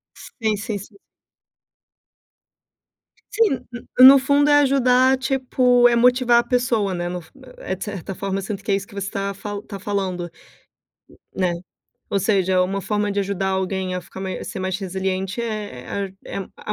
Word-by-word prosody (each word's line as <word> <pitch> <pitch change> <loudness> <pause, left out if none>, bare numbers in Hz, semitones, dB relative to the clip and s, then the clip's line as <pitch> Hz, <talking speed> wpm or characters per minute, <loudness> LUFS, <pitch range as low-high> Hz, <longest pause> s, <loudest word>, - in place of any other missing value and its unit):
Sim, 220 -4 -3
sim, 210 0 -4
sim. 200 +1 -13 2.4
Sim, 420 - +2 0.3
no 255 - +9
no 275 +1 +10
fundo 285 +2 +3
é 290 - +6
ajudar, 260 -1 +4
tipo 255 -2 +3
é 235 - +2
motivar 245 0 +4
a - - -2
pessoa, 235 -6 0
né, 175 0 -3
no 180 -1 -5
fu 160 - -21 0.3
é 190 - -4
de 190 - -11
certa 195 -2 -5
forma, 195 0 -3
sendo 200 +1 -5
que 205 - -4
é - - +4
isso 200 0 -2
que - - -16
você 195 0 -4
tava 200 +1 -4
tá 200 -2 -8
falando, 185 -4 -3 1.1
né, 185 -2 +1 0.6
ou 200 - +1
seja, 190 -2 +2
uma 195 +2 0
forma 205 0 -1
de 200 - 0
ajudar 195 -1 -1
alguém, 190 -1 -2
a 180 - -2
ficar 190 +2 -11
mais 190 -1 -5
ser - - -6
mais 185 0 -2
resiliente 190 +2 -3
é 205 - -4 0.2
é - - -5 0.2
a 210 - -5
200 Hz, 170 wpm, -22 LUFS, 190-240 Hz, 2.4 s, no